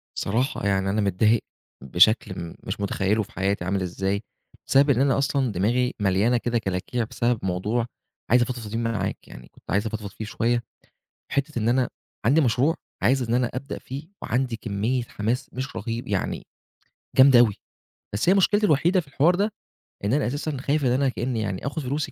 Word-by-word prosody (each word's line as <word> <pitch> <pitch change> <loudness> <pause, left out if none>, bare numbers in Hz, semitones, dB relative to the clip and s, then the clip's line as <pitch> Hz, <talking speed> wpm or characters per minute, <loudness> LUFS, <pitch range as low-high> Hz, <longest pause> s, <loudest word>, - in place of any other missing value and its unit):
صراحة 120 +3 -1
يعني 95 -1 +1
أنا 105 +2 +1
متضايق 105 +3 +2 0.4
بشكل 95 - +3
م 85 -1 -7
مش 95 +4 -4
متخيّله 100 +1 0
في 115 - -15
حياتي 95 -2 -1
عامل 95 +1 0
إزاي، 95 +2 -1 0.5
بسبب 140 +2 +5
إن 130 -2 +4
أنا 140 0 +3
أصلًا 135 -2 +1
دماغي 120 +7 +1
مليانة 100 +5 +2
كده 120 0 0
كلاكيع 105 +3 -2
بسبب 120 +1 0
موضوع 105 +6 0 0.5
عايز 125 +1 +6
أفضفض 120 -3 -3
فيه 115 - -2
معاك 115 -1 -2
يعني - - -12
كنت - - -12
عايز 100 +4 +1
أفضفض 110 -2 -5
فيه 110 - -7
شوية. 120 +2 0 0.7
حتّة 140 -1 -1
إن 110 0 0
أنا 125 +1 +2 0.4
عندي 140 +8 +5
مشروع 135 +4 +2 0.3
عايز 130 +6 +3
إن 115 -1 -1
أنا 125 -1 +1
أبدأ 135 +3 -5
فيه 140 +5 -8
وعندي 125 -1 -1
كمّية 110 +4 -1
حماس 120 +4 -3
مش 130 +1 -5
رهيب 115 +2 -4
يعني 100 -2 -2 0.7
جامدة 130 -2 +8
أوي، 110 -5 +5 0.6
بس 105 - 0
هي 185 - +7
مشكلتي 205 +2 +3
الوحيدة 170 +4 +3
في 160 - -14
الحوار 150 +5 +3
ده 205 +3 0 0.5
إن 105 +5 +1
أنا 145 -3 +2
أساسًا 145 +2 -3
خايف 140 +2 0
إن 125 - +3
أنا 135 +2 +2
كإنّي 125 -1 -2
يعني 100 -4 -3
آخُد 150 +3 -3
فلوسي 140 +3 -2
120 Hz, 180 wpm, -25 LUFS, 105-135 Hz, 0.7 s, جامدة